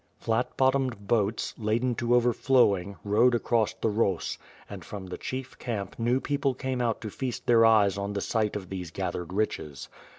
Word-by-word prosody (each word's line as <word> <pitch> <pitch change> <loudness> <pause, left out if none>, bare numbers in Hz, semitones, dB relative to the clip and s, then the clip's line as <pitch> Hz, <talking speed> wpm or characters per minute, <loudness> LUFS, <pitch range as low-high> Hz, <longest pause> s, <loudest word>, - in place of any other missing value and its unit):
Flat 115 +2 -1
bottomed 130 -6 +1
boats, 110 -1 0
laden 115 +3 +1
to 120 +1 +1
overflowing 120 -5 +3
rowed 115 +4 +4
across 115 -2 +1
the 115 - -1
Ros; 100 -4 0 0.3
and - - -8
from 100 -2 -7
the 90 - -6
chief 130 0 -6
camp 105 -5 -4
new 120 +3 +2
people 140 -1 -1
came 130 -1 -2
out 115 -2 0
to 110 -3 -5
feast 130 +1 -4
their 115 -1 +5
eyes 100 -3 +4
on 100 +1 -3
the 100 - -1
sight 110 -1 0
of 95 -3 -5
these 90 -3 -5
gathered 90 -1 -4
riches. 75 - -3
115 Hz, 175 wpm, -27 LUFS, 100-125 Hz, 0.3 s, their